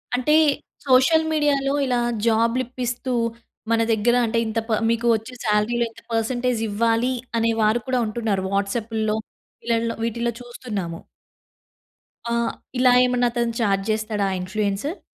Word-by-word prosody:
అంటే 300 +5 +2 0.5
సోషల్ 275 +5 +4
మీడియా‌లో 285 -3 +1
ఇలా 250 -2 +1 0.3
జాబ్‌‌లిప్పిస్తూ, 245 +2 0 0.6
మన 230 0 +3
దగ్గర 230 +3 +2
అంటే 230 +1 -1
ఇంత 220 +1 -1
ప - - -1 0.2
మీకు 230 +1 0
వచ్చే 225 +4 -6
సాలరీ‌లో 220 +3 +1
ఇంత - - -16
పర్సెంటేజ్ 240 +1 0
ఇవ్వాలీ. 230 +4 +1 0.2
అనే 230 0 +2
వారు 215 +2 +2
కూడా 255 -1 +1
ఉంటున్నారు. 215 -4 -1
వాట్సాపుల్లో 215 +2 -1 0.4
వీళ్ళల్లో 230 0 0
వీటిల్లో 235 +1 -1
చూస్తున్నాము. 210 -9 -5 1.4
ఆహ్, 235 0 0 0.3
ఇలా 250 -1 +5
ఏమన్నా 245 -1 +2
అతను 235 -1 -1
చార్జ్ 195 -2 +1
చేస్తాడా? 215 -1 -1
ఆ - - -1
ఇన్‌ఫ్లూయెన్సుర్. 210 - -2
230 Hz, 125 wpm, -23 LUFS, 215-250 Hz, 1.4 s, ఇలా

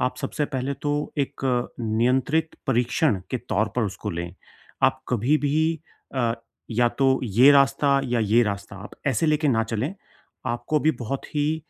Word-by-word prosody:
आप 125 - 0
सबसे 150 - -2
पहले 135 0 -3
तो 145 0 -1
एक 140 - -2 0.4
नियंत्रित 130 +8 +1
परीक्षण 125 - +1
के 130 - -1
तौर 105 -2 -1
पर 125 - +2
उसको 105 +1 -4
लें, 85 -1 -5 0.5
आप 130 0 +3
कभी 125 +5 +2
भी 155 +2 +1 0.3
अ, 120 -3 +1 0.4
या 120 +2 +3
तो 135 +1 +2
ये 120 +6 +6
रास्ता, 140 0 +4
या 120 -2 0
ये 110 +3 +4
रास्ता, 100 -2 -4
आप 100 +2 -9 0.2
ऐसे 135 +3 +1
लेके 155 0 +2
ना 115 -4 +3
चलें 115 - -3 0.5
आपको 120 +6 0
भी 155 - +3
बहुत 125 +4 -3
ही 150 +2 +1
130 Hz, 165 wpm, -24 LUFS, 115-145 Hz, 0.5 s, ये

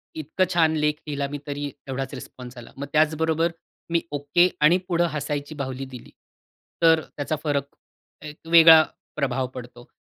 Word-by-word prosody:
इतकं 160 +4 -1
छान 160 -2 +3
लेख 150 0 +2
लिहिला 140 -1 -2
मी 145 - -5
तरी 145 0 -4 0.2
एवढाच 135 0 -4
रिस्पॉन्स 125 0 -10
आला. 120 - -11
मग 140 - -4
त्याचबरोबर 160 +2 +2 0.4
मी 170 0 +2
ओके 145 +5 +2
आणि 155 +4 +6
पुढं 175 -1 +1
हसायची 145 0 -4
बाहुली 135 -2 -5
दिली, 120 - -12 0.7
तर 165 -1 +5
त्याचा 145 +2 -2
फरक 140 -2 -2 0.5
एक 150 0 -9
वेगळा 165 -1 +8 0.3
प्रभाव 130 -3 -1
पडतो. 120 -1 -10
150 Hz, 150 wpm, -24 LUFS, 140-160 Hz, 0.7 s, वेगळा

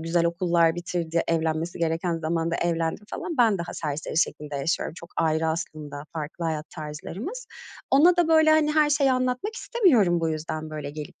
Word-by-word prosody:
güzel 165 +1 +1
okullar 170 -1 +2
bitirdi, 170 -1 -2
evlenmesi 165 +1 -1
gereken 165 +1 0
zamanda 165 +1 -1
evlendi 165 -1 -1
falan. 335 -2 -4
Ben 225 -5 +4
daha 170 - -5
serseri 150 +1 -3
şekilde 150 -4 -1
yaşıyorum. 155 +3 -1
Çok 170 - -10
ayrı 160 0 +1
aslında, 150 -3 -5
farklı 160 +2 -5
hayat 155 -1 -3
tarzlarımız. 180 - -7 0.4
Ona 335 +6 +6
da 345 -2 +3
böyle, 315 -1 +5
hani, 310 -1 +4
her 300 -1 +4
şeyi 280 -2 +3
anlatmak 255 - -1
istemiyorum, 250 - +3
bu 165 - 0
yüzden, 155 0 -4
böyle 150 -2 -5
gelip 150 0 -9
170 Hz, 165 wpm, -25 LUFS, 160-250 Hz, 0.4 s, Ona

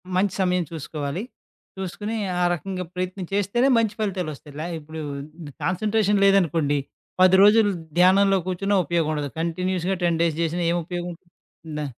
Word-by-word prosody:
మంచి 190 +1 +2
సమయం 180 -1 +2
చూసుకోవాలి? 155 +2 -4 0.5
చూసుకొని 205 +4 -4 0.3
ఆ - - +3
రకంగా 185 +2 -4
ప్రయత్నం 185 +1 -4
చేస్తేనే 205 +6 +2
మంచి 225 -2 +1
ఫలితాలొస్తాయి. 175 -8 -4
ల - - -3 0.2
ఇప్పుడు 155 +1 -9 0.6
కాన్సన్‌ట్రేషన్ 205 +2 +1
లేదనుకోండి. 165 -7 +3 0.4
10 185 0 +7
రోజులు 210 +1 +6 0.3
ధ్యానంలో 195 +2 +5
కూర్చున్న 195 +3 -1
ఉపయోగం 165 -1 0
ఉండదు. 145 -2 -2
కంటిన్యూస్‌గా 180 +2 -1
10 170 -2 +1
డేస్ 165 -2 +2
చేసినా 170 +1 -1
ఏం 175 - +1
ఉపయోగం 175 0 -4
ఉంటంది? 170 +1 -21 0.5
డా 150 - -2
180 Hz, 140 wpm, -24 LUFS, 165-195 Hz, 0.6 s, 10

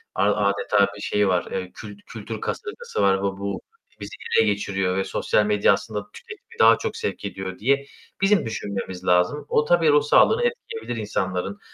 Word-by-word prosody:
a 105 0 +2
adeta 100 0 +2
bir 100 - -10
şey 105 -1 +1
var? 90 -1 +1
Eee, 95 -1 -4
kül 105 -2 -9
kültür 110 0 -7
kasırgası 470 +3 -4
var 95 -1 +4
ve - - -6
bu 100 -1 -3 0.4
bizi - - -8 0.2
ele 110 - +5
geçiriyor 95 -2 -1
ve 95 - +1
sosyal 105 - +1
medya 105 -1 +4
aslında 105 0 -4
tüketimi 465 0 -13
daha - - +7
çok 455 -1 -4
sevk 445 - -4
ediyor." 95 -2 -6
diye 140 +5 +1 0.4
bizim 195 - +3
düşünmemiz 95 -4 -5
lazım. 90 +12 +2
O, 150 - +2
tabii 165 -1 +3
ruh 145 0 +5
sağlığını 450 - +4
etkileyebilir 470 - -3
insanların, 95 -1 -3
105 Hz, 175 wpm, -23 LUFS, 95-150 Hz, 0.4 s, daha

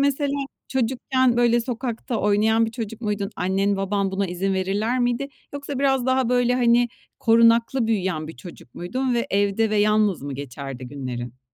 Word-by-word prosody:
mesela 280 0 +1 0.4
çocukken, 260 0 +1
böyle, 240 0 +3
sokakta 240 0 -3
oynayan 220 +2 +3
bir - - -4
çocuk 225 -1 -6
muydun? 205 -3 -2
Annen, 195 +2 +1
baban 195 0 -1
buna 195 +1 -1
izin 190 +2 -1
verirler 205 +6 0
miydi? 245 +3 0 0.3
Yoksa 285 -1 -5
biraz 270 -2 +2
daha, 260 -1 +2
böyle, 245 0 +2
hani, 240 -1 +3 0.3
korunaklı 230 +2 +4
büyüyen 185 -8 -1
bir 160 - -9
çocuk 130 -3 -13
muydun 255 +8 -2
ve 235 - 0
evde 205 +2 +1
ve 215 - +1
yalnız 210 -4 +2
mı 140 -1 -5
geçerdi 135 -1 -7
günlerin? 125 -3 -6
220 Hz, 160 wpm, -23 LUFS, 190-245 Hz, 0.4 s, korunaklı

